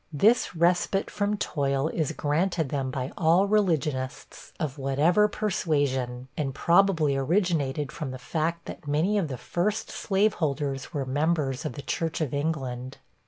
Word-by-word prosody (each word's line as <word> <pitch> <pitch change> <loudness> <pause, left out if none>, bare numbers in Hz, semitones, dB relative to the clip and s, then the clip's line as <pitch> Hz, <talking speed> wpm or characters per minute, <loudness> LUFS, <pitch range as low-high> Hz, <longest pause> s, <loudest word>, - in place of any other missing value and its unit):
This 210 - +3
respite 175 +3 +2
from 205 0 0
toil 140 -5 0
is 160 -3 -1
granted 160 +1 0
them 135 -2 -1
by 130 +1 -3
all 170 +4 +4
religionists, 160 -11 -1
of 150 -4 -3
whatever 150 +10 +3
persuasion, 140 - -1
and 135 -3 -2
probably 170 -4 +3
originated 145 -2 0
from 150 -4 -5
the 130 - -6
fact 165 +6 -2
that 150 - -9
many 165 +9 +2
of 175 - -1
the 130 -3 -5
first 200 - -2
slaveholders 155 - 0
were 145 -5 -2
members 145 0 0
of 155 - -3
the 140 - -8
Church 165 -1 -2
of 150 -5 -2
England. 135 -4 -3
155 Hz, 145 wpm, -27 LUFS, 135-175 Hz, -, all